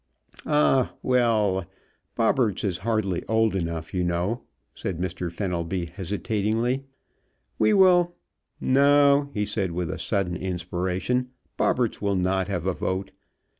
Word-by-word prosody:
"Ah 150 -3 +3
well, 110 -7 +2 0.5
Bobberts 115 -2 +1
is 95 -4 -1
hardly 110 -5 0
old 110 -2 +2
enough, 85 -3 -3
you 90 -1 0
know," 90 +7 -1 0.3
said 95 -4 -4
Mr. 90 0 -3
Fenelby 90 -1 -2
hesitatingly. 110 +6 -1 0.7
"We 215 - +4
will 175 -2 +5 0.4
No," 140 +1 +4
he 105 0 0
said 95 -5 -2
with 85 -1 -3
sudden 90 -3 -1
inspiration, 90 +7 -2 0.3
"Bobberts 120 -3 0
will 100 -1 +1
not 95 0 +1
have 90 -4 -3
a 95 - +1
vote. 95 +2 -3
100 Hz, 120 wpm, -25 LUFS, 90-125 Hz, 0.7 s, will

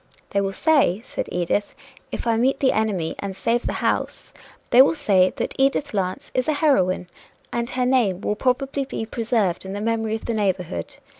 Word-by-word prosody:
"They 200 - +1
will 195 0 -1
say," 265 - +2
said - - -4
Edith, 180 +4 -1 0.4
"if - - -4
I 230 -1 +2
meet 260 +4 +2
the 265 - +3
enemy 200 -7 0
and 195 -1 -4
save 235 +5 0
the - - -1
house - - -2 0.4
they 245 - +8
will 280 - +4
say 195 -11 +3
that - - -3
Edith 275 0 +1
Lance 195 +8 -2
is 255 - 0
a 310 - +2
heroine, 195 - +2 0.5
and 235 0 -1
her 255 -2 0
name 235 -8 +2
will 210 - 0
be 210 - -11
probably 270 -1 -1
preserved 220 -6 0
in 190 0 -6
the 205 - -4
memory 225 0 -1
of 225 - -7
the 235 - -1
neighborhood. 185 - -2
225 Hz, 195 wpm, -23 LUFS, 195-260 Hz, 0.5 s, they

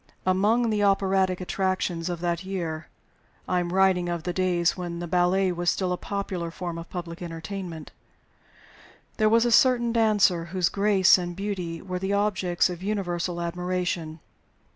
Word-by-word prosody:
Among 215 +6 +2
the 210 -1 0
operatic 190 -2 +2
attractions 185 -2 -1
of 175 -1 -4
that 175 0 -1
year 170 -5 -4 0.6
I 180 - +1
am 175 -1 -2
writing 185 -2 +3
of 170 -2 -3
the 180 - -2
days 180 -2 +1
when 175 -2 -5
the 175 - -4
ballet 180 +2 +2
was 175 0 0
still 185 0 0
a - - 0
popular 190 -4 -4
form 170 0 -5
of 165 - -9
public 175 -1 -6
entertainment 170 0 -6 1.3
there 215 -1 +3
was 230 +2 +4
a 240 - +1
certain 240 -1 +4
dancer 210 -7 +3
whose 180 0 0
grace 200 -2 +4
and 175 -1 -4
beauty 185 -4 -4
were 185 -1 -4
the 190 +2 -1
objects 195 -4 +1
of 180 -1 -6
universal 180 -4 -2
admiration. 175 -2 -3
180 Hz, 160 wpm, -26 LUFS, 175-195 Hz, 1.3 s, was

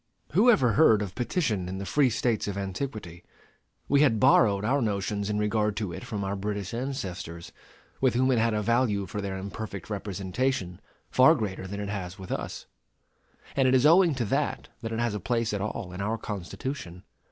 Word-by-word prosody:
Who 210 +10 +5
ever 130 - +5
heard 110 -6 +5
of 95 -3 -6
petition 120 - -1
in 95 - -4
the 100 - -5
free 140 +4 +3
States 115 -2 0
of 100 -1 -3
antiquity? 95 -3 -5 0.6
We 140 0 +4
had 125 -7 +4
borrowed 105 -5 +4
our 135 +5 +2
notions 100 -1 -1
in 105 - 0
regard 105 0 0
to 100 -6 -3
it - - -7
from 105 -2 -4
our 100 +1 -2
British 100 0 -4
ancestors, 95 -10 -5 0.5
with 130 -3 +3
whom 130 +2 +3
it 120 - +3
had 115 -1 +2
a 105 - 0
value 115 -3 +1
for 105 +3 -5
their 95 -1 -4
imperfect 100 0 -6
representation 100 0 -2 0.3
far 130 +6 +6
greater 100 -6 -4
than 100 +2 -5
it 100 -1 -4
has 95 -3 -5
with 95 -1 -9
us; - - -4 0.9
and 135 -1 +3
it 130 - +4
is 130 +2 +4
owing 170 0 +6
to 125 -3 -1
that - - -1
that 115 - -4
it 115 - -2
has 120 -2 0
a 105 - -3
place 115 +2 -1
at 100 - -2
all 105 -2 -4
in 90 - -5
our 110 +3 -1
Constitution. 100 -1 -6
105 Hz, 195 wpm, -27 LUFS, 100-125 Hz, 0.9 s, far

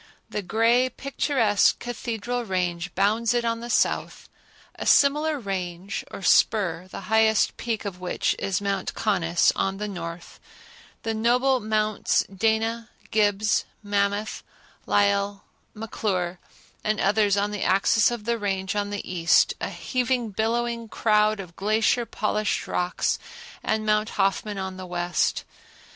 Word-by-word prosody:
The 210 - -2
gray, 230 +6 +2
picturesque 255 -6 +1
Cathedral 240 0 -4
Range 180 -3 -2
bounds 220 +5 +2
it 240 -1 +1
on 230 0 0
the 240 +1 -7
south; - - 0 0.5
a - - -6
similar 300 +2 +4
range 190 -3 -4
or 195 - -8
spur, 185 -4 +3
the 185 - -8
highest 220 +2 +3
peak 225 -3 -3
of 185 -3 -5
which 180 -1 -1
is 190 -3 -1
Mount 200 -2 -2
Conness, 175 -5 +2
on 195 0 -1
the 210 +1 -3
north; 170 -3 -7 0.6
the 225 - -1
noble 250 +4 +2
Mounts 215 -1 +1
Dana, 225 +2 0 0.2
Gibbs, 210 0 +2 0.2
Mammoth, 205 +1 -1 0.5
Lyell, 200 0 +1 0.3
McClure 190 -5 -2 0.4
and 215 -1 0
others 205 0 +3
on 205 +1 0
the 205 -2 -4
axis 200 +3 +3
of 240 -3 -5
the 235 +1 -1
Range 195 -1 -2
on 205 0 -1
the 205 -1 -5
east; 170 -2 +3
a - - -2
heaving, 250 -3 -1
billowing 230 +2 -1
crowd 215 -1 +2
of 175 -3 -9
glacier 220 +3 +1
polished 210 0 -1
rocks 180 0 -1 0.4
and 215 0 -1
Mount 215 +1 +2
Hoffman 200 +1 0
on 190 -1 -4
the 185 -1 -7
west. 175 0 0
210 Hz, 135 wpm, -25 LUFS, 195-225 Hz, 0.6 s, similar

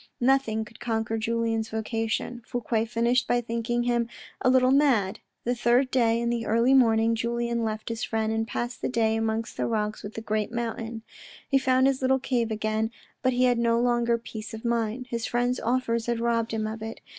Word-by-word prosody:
Nothing 240 -4 +2
could 215 0 -16
conquer 225 -1 -1
Julien's 225 0 -1
vocation. 225 +2 -2
Fouque 230 -2 -1
finished 240 +2 +1
by 245 - +2
thinking 235 0 -1
him 240 -1 0 0.3
a 255 - +3
little 255 0 +4
mad. 240 -8 +3 0.2
The 245 - +1
third 245 +2 +2
day, 230 -3 +3
in 235 0 0
the 235 -1 -2
early 230 +4 +3
morning, 230 -3 +4
Julien 235 0 -1
left 215 0 -3
his 230 0 -3
friend, 220 0 -1
and 225 0 -1
passed 240 +1 -4
the - - -1
day 225 -3 +1
amongst 225 0 -2
the - - 0
rocks 215 -2 -2
of 205 - -8
the 225 - -4
great 215 -1 -1
mountain. 230 -1 -4 0.4
He 275 - +3
found 260 0 +3
his 270 -1 +2
little 265 0 +3
cave 245 -3 -1
again, 215 0 -1 0.3
but 255 -1 +2
he 250 +1 +2
had 245 -2 +3
no 235 0 +2
longer 240 -1 +2
peace 225 -1 -8
of 220 - -10
mind. 235 +1 -1
His 230 0 -2
friend's 245 +1 0
offers 235 -1 0
had 235 -1 0
robbed 230 -1 0
him 220 -1 -1
of 215 +1 -5
it. 225 0 -6
230 Hz, 200 wpm, -26 LUFS, 225-245 Hz, 0.4 s, little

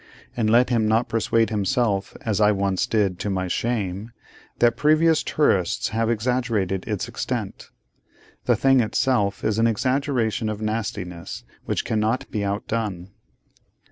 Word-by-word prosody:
And 110 -3 +1
let 120 +3 +4
him 115 -3 +2
not 110 +2 +2
persuade 115 0 +1
himself 105 -1 0
(as 110 -2 -1
I 105 0 +5
once 100 +2 0
did, 100 -6 0
to 105 - -2
my 95 -1 -1
shame) 105 0 -2 0.4
that 120 -1 +3
previous 155 +1 +3
tourists 95 - +1
have 115 0 0
exaggerated 110 -5 -1
its - - -2
extent. - - -4 0.8
The - - +3
thing 135 -1 +4
itself 105 -3 +1
is 110 0 0
an 115 - +4
exaggeration 120 -2 0
of 105 -1 -4
nastiness, 105 -5 -4 0.2
which - - -2
cannot 110 +3 0
be 105 -2 -2
outdone. 100 -2 -3
110 Hz, 140 wpm, -23 LUFS, 100-120 Hz, 0.8 s, I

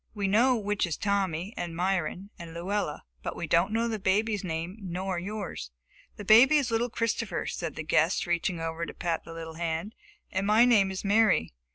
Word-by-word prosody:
We 200 -2 -1
know 240 +6 +4
which 205 -4 -1
is 165 - -3
Tommy, 195 -2 -1
and 170 -1 -4
Myron, 185 +2 -1
and 170 -1 -9
Luella, 180 -2 -2 0.2
but - - -4
we - - -4
don't 170 +5 +2
know 230 +1 +1
the 220 -2 -2
baby's 205 +2 +1
name, 170 +3 -4
nor 185 0 -3
yours." 195 - -5 0.5
"The 205 - -8
baby 240 +9 +7
is 275 -5 0
little 230 +2 +1
Christopher," 230 0 -2
said - - -4
the - - -4
guest, - - +2
reaching 175 0 -1
over 165 +1 -3
to - - -8
pat 170 -2 -2
the 165 - -9
little 160 -1 -7
hand, 170 +5 -3 0.4
"and 190 +1 -1
my 220 +3 +6
name 210 -6 +4
is 190 +1 -5
Mary. 205 - +3
190 Hz, 195 wpm, -28 LUFS, 170-215 Hz, 0.5 s, baby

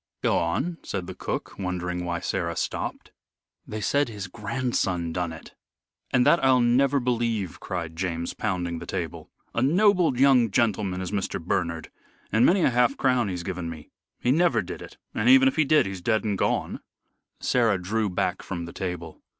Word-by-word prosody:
"Go - - +3
on," 135 - -1
said 95 -3 -4
the 95 - -7
cook, 95 - -5
wondering 90 -1 -3
why 85 -1 -2
Sarah - - -2
stopped. - - -4 0.6
"They 110 0 -5
said 140 +6 +1
his 105 -3 -6
grandson 100 -5 -2
done 90 -1 -2
it." 80 - -11 0.6
"And 125 - +3
that 170 - +4
I'll 130 -1 +5
never 130 +4 +3
believe," 115 -6 -1
cried 85 -4 -5
James, 85 -1 -2
pounding 90 -5 -2
the - - -9
table. - - -4 0.2
"A 115 - 0
noble 180 - +3
young 130 -4 +5
gentleman 100 -4 0
Mr. 95 +1 -2
Bernard, 85 -1 -2 0.4
and 110 - +3
many 185 +7 +5
a - - +4
half 125 +2 +2
crown 125 -5 +2
he's 90 -2 -4
given 90 -2 -4
me. 80 -2 -10 0.3
He 125 - +1
never 170 +5 +3
did - - -7
it, - - -11 0.2
and - - +1
even 265 +1 +8
if 270 - +1
he 155 - +3
did, 155 -3 +4
he's 95 -2 -5
dead 110 +3 +1
and 105 -2 0
gone." - - -1 0.6
Sarah 115 -6 +2
drew 105 +4 -1
back 90 - -1
from 85 -1 -5
the 85 - -9
table. 90 -3 -5
105 Hz, 180 wpm, -26 LUFS, 90-125 Hz, 0.6 s, even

